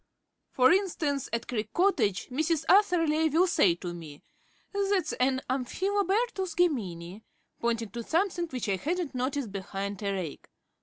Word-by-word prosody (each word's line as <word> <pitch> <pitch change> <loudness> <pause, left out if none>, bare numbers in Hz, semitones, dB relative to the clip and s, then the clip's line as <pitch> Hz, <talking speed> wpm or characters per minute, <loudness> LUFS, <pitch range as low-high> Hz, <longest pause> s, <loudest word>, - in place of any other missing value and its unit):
For 255 +2 +4
instance, 330 -8 0
at 230 0 -2
Creek 215 -3 -3
Cottage, 250 - +2
Mrs. 315 +4 0
Atherley 330 -6 +4
will 330 +5 +4
say 195 - +3
to 175 0 -6
me, 155 -4 -10 0.5
"That's 395 -5 +1
an 260 +1 +1
Amphilobertus 385 - 0
Gemini," 195 - 0 0.4
pointing 230 -2 -1
to 235 - -5
something 345 - 0
which 255 -7 -4
I 195 -1 +1
hadn't 335 - -2
noticed 255 -2 -2
behind 200 +1 -5
a 200 -1 -1
rake. 185 -6 -5
270 Hz, 140 wpm, -29 LUFS, -, 0.5 s, For